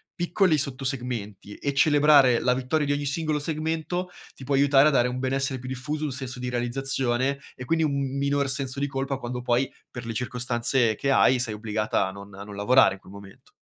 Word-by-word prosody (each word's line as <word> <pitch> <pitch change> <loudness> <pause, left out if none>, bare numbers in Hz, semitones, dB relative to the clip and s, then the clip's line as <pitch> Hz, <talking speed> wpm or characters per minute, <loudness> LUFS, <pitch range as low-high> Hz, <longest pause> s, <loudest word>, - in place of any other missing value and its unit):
piccoli 175 -1 +2
sotto 135 -1 -3
segmenti 120 -6 -4
e 140 - -3
celebrare 145 -4 +5
la 125 - +2
vittoria 130 +4 -1
di 145 - -1
ogni 145 0 -2
singolo 155 +1 -1
segmento, 160 +4 -3 0.3
ti - - -12
può 140 - -1
aiutare 140 +1 +5
a - - 0
dare 125 -3 +3
un 125 0 -4
benessere 135 +1 -1
più 130 - -9
diffuso, 130 +4 -4
un 145 - -3
senso 130 -1 -5
di 125 - -4
realizzazione 130 +2 -1 0.2
e, 125 - -8
quindi, 160 +4 +1
un 140 -2 -2
minor 140 0 0
senso 135 0 -2
di 140 - 0
colpa 135 0 -3
quando 125 -1 -5
poi, 125 +2 0 0.2
per 125 -1 -8
le 115 - -4
circostanze 125 0 0
che 140 - -2
hai, 130 -1 +4
sei 115 -3 -2
obbligata 110 -1 -1
a - - -5
non 100 +1 -11
a 100 - -8
non 105 0 -10
lavorare 110 +1 +4
in - - -17
quel 95 - -15
momento. 100 -1 -14
130 Hz, 210 wpm, -25 LUFS, 120-140 Hz, 0.3 s, celebrare